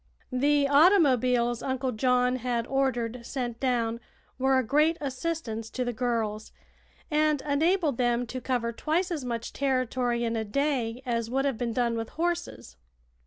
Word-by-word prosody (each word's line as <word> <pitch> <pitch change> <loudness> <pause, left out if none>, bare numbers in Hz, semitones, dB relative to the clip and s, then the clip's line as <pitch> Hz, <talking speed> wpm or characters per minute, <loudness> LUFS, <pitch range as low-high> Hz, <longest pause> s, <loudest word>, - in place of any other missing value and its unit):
The 285 +2 +3
automobiles 255 - +4
Uncle 260 -1 -1
John 250 +2 +2
had 240 -2 -1
ordered 250 -3 -1
sent 240 -2 -4
down 235 -3 0 0.4
were 265 0 +3
a 260 - +2
great 300 +7 +2
assistance 265 -5 -4
to 250 +2 -3
the 245 - -2
girls, 220 -3 -2 0.6
and 305 -1 +2
enabled 305 0 +1
them 240 0 +1
to 255 +2 -6
cover 245 -3 -1
twice 335 - -1
as 310 -6 -3
much 235 -2 -4
territory 255 -3 0
in 230 0 -1
a 220 - -1
day 250 0 -1
as 230 -2 -1
would 270 +3 0
have 270 -5 -1
been 235 -2 -1
done 235 -1 +1
with 225 0 -4
horses. 340 - -3
250 Hz, 155 wpm, -27 LUFS, 235-280 Hz, 0.6 s, automobiles